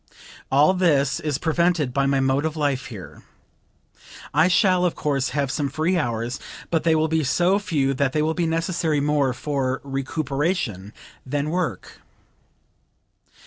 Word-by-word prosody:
All 145 +7 +5
this 150 -6 +2
is 150 -4 -2
prevented 165 -3 +1
by 140 +1 +1
my 135 0 +2
mode 135 +1 +1
of 160 0 -2
life 145 -1 -1
here. 105 -8 -10 1.1
I 155 +4 +4
shall, 185 0 +3
of 180 - +1
course, 140 -3 -1
have 140 -1 -1
some 145 -1 -1
free 155 +6 0
hours, 120 -5 -2 0.3
but 165 -2 +2
they 165 -1 +3
will 155 0 +2
be 160 0 0
so 175 +8 +2
few 145 -9 0
that 135 0 0
they 150 +2 0
will 160 +1 +1
be 170 0 -1
necessary 165 -1 0
more 145 -2 +1
for 130 0 -2
recuperation 135 - -2 0.3
than 145 +3 -2
work." 170 - -3
150 Hz, 150 wpm, -23 LUFS, 135-165 Hz, 1.1 s, All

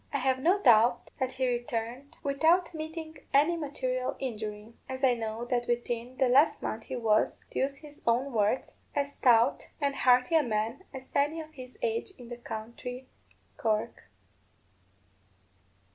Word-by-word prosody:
I - - 0
have 260 -1 +1
no 355 +9 +3
doubt 240 - +4
that 260 -1 -1
he 260 0 0
returned 240 +4 -3
without 325 +6 +3
meeting 315 -1 -6 0.2
any 300 +5 +5
material 255 -5 -2
injury, 215 -3 -5 0.2
as 260 +1 -5
I 255 -2 +6
know 225 0 -4
that 245 -1 -1
within 240 +1 -2
the 260 - +3
last 280 +6 +4
month 220 0 -3
he - - -5
was, 220 -3 +1
to - - -2
use 275 +1 0
his 295 -1 -13
own 250 +4 +2
words, 215 +3 0 0.2
"as 285 0 -1
stout 245 0 +3
and 280 -2 0
hearty 250 +3 +4
a 320 - +6
man 230 - -2
as 260 -1 -10
any 295 +3 +1
of 310 -1 -9
his 255 -3 -10
age 455 -4 -1
in 245 -3 -11
the 240 - -6
county 240 +3 -7 0.5
Cork." 220 - -1
255 Hz, 160 wpm, -29 LUFS, 235-285 Hz, 0.5 s, I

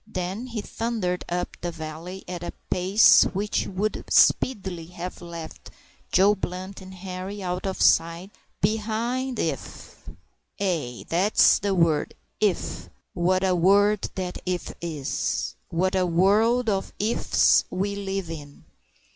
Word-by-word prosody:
Then 195 +4 -4
he 230 -3 -4
thundered 210 -5 -2
up 175 +1 -3
the 175 - -2
valley 165 +3 -7
at 180 -1 -5
a 175 - -5 0.2
pace 190 +4 +6
which 205 +2 -1
would 200 +3 -2
speedily 190 -9 +3
have 180 +1 -7
left 170 -2 -9 0.4
Joe 195 +3 +5
Blunt 185 0 -6
and 190 0 -11
Henri 190 +2 -6
out 180 +1 -3
of 190 - -3
sight 170 +4 +3 0.3
behind 225 +5 -1
if 140 - -5 0.5
ay! 160 -12 -2
that's 185 +6 +4
the 200 -1 0
word, 165 -4 +2 0.2
if! - - -1 0.2
What 185 +2 +1
a 190 -1 +3
word 200 +4 +3
that 180 -1 -4
if 180 -1 -3
is! 155 -5 -2 0.2
what 185 +3 0
a 185 -1 +2
world 215 +8 +3
of 195 -3 -1
if's 220 +3 +3
we 200 +2 -2
live 195 -3 -4
in! 145 -3 -9
185 Hz, 130 wpm, -25 LUFS, 175-205 Hz, 0.5 s, pace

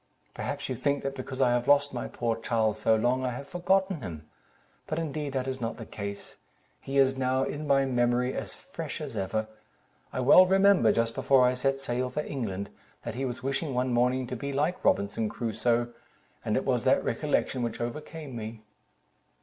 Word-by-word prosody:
"Perhaps - - -4
you - - -2
think 140 0 0
that 135 - -2
because 130 0 -5
I 125 - +4
have 120 +1 0
lost 145 0 +4
my 125 - -3
poor 115 -2 -1
Charles 110 -1 0
so 110 - +4
long, 125 +4 +1
I 130 - 0
have 125 +3 -6
forgotten 190 0 +1
him; 80 -7 -7 0.6
but 155 - -2
indeed 150 -3 -3
that 130 -1 -1
is 130 -1 -4
not 115 0 -3
the 115 - -7
case: 100 -1 -7 0.4
he 135 +1 -4
is 135 -1 +4
now 130 0 +1
in 150 +2 -4
my 135 -1 +4
memory 125 0 +1
as - - -5
fresh - - -7
as - - -6
ever. 110 +3 -1 0.6
I - - -3
well 180 +8 +8
remember, 195 - +5
just 115 0 0
before 135 0 +4
I 125 - +3
set 135 +2 0
sail 125 -1 -1
for 150 +4 -2
England, 100 -7 -4 0.3
that 115 - -4
he 130 +3 -2
was 130 0 -5
wishing 135 +1 -2
one 125 0 +1
morning 125 +2 +2
to 125 - -5
be 140 +4 -4
like 150 +6 -1
Robinson 100 +2 +1
Crusoe, 120 +1 0 0.5
and - - 0
it - - -1
was - - +1
that - - +4
recollection 130 - 0
which 115 -2 -3
overcame 150 +3 -5
me." 110 0 -7
130 Hz, 195 wpm, -28 LUFS, 115-140 Hz, 0.6 s, well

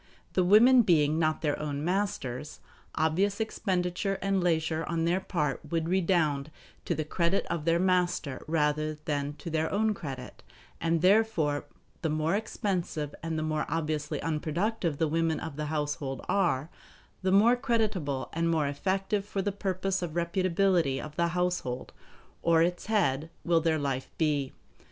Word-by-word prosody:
The 185 - +3
women 235 +7 +7
being 155 -6 +3
not 155 0 +1
their 145 -2 0
own 145 0 -3
masters, 155 -8 -2 0.4
obvious 190 +7 +1
expenditure 190 -3 -1
and 195 -2 0
leisure 160 -2 +1
on 165 -1 -1
their 175 +2 +2
part 170 -5 -1
would 165 -1 -1
redound 165 -6 +1 0.4
to - - 0
the 155 - -2
credit 170 +4 0
of 155 -3 -2
their 165 0 +3
master 180 -6 0
rather 155 -1 +1
than 145 -1 -3
to 165 +3 -8
their 160 0 0
own 215 +2 +2
credit; 135 -9 -7 0.4
and 165 0 +1
therefore 185 -8 +3 0.4
the 160 - 0
more 155 +2 0
expensive 185 -8 -2
and 165 -1 -3
the 155 - -1
more 155 -1 -1
obviously 155 -2 -2
unproductive 165 +2 -1
the 160 - +1
women 165 +1 0
of 160 -3 -6
the 150 +1 -3
household 145 -3 -3
are, 155 -6 +1 0.5
the 190 0 +1
more 220 +5 +6
creditable 200 - -1
and 165 +1 0
more 160 -3 +2
effective 195 +7 -1
for 195 -1 -3
the 205 - 0
purpose 195 -1 -2
of 170 -3 -4
reputability 175 -4 +1
of 150 -1 -8
the 170 - +2
household 180 -8 -2 0.5
or 165 -1 +4
its 175 +2 -2
head 165 -9 +1
will 170 -1 +3
their 160 -1 +2
life 135 -3 -2
be. 145 -4 +1
165 Hz, 155 wpm, -29 LUFS, 150-190 Hz, 0.5 s, women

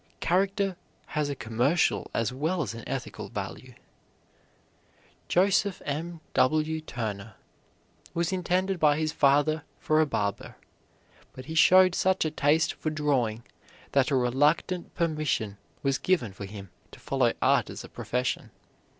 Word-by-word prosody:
Character 195 +1 +1 0.4
has 150 -2 0
a 140 - -2
commercial 125 +8 +1
as 115 +1 -1
well 160 +6 -1
as 110 -4 -5
an 115 - -8
ethical - - -5
value. - - -7 1.5
Joseph 195 +1 +2
M. 160 +3 -4
W. 155 +3 +2
Turner 110 -7 -5 0.8
was 170 +1 0
intended 185 +1 0
by 150 -2 +4
his 155 0 0
father 150 +1 +3
for 155 0 +2
a 155 - +2
barber, 100 -7 -2 0.8
but 130 - -10
he 160 - -6
showed 185 +3 +6
such 190 -1 +2
a 155 - -1
taste 155 +2 +2
for 155 - -3
drawing 135 -7 0 0.5
that 135 0 +3
a 140 - +1
reluctant 145 +8 +1
permission 150 - -1 0.2
was 135 -1 +1
given 165 - 0
for 100 +1 -7
him 100 -2 -10 0.2
to - - -13
follow - - +1
art - - +3
as - - -7
a - - -9
profession. 125 +1 -3
150 Hz, 140 wpm, -27 LUFS, 125-170 Hz, 1.5 s, showed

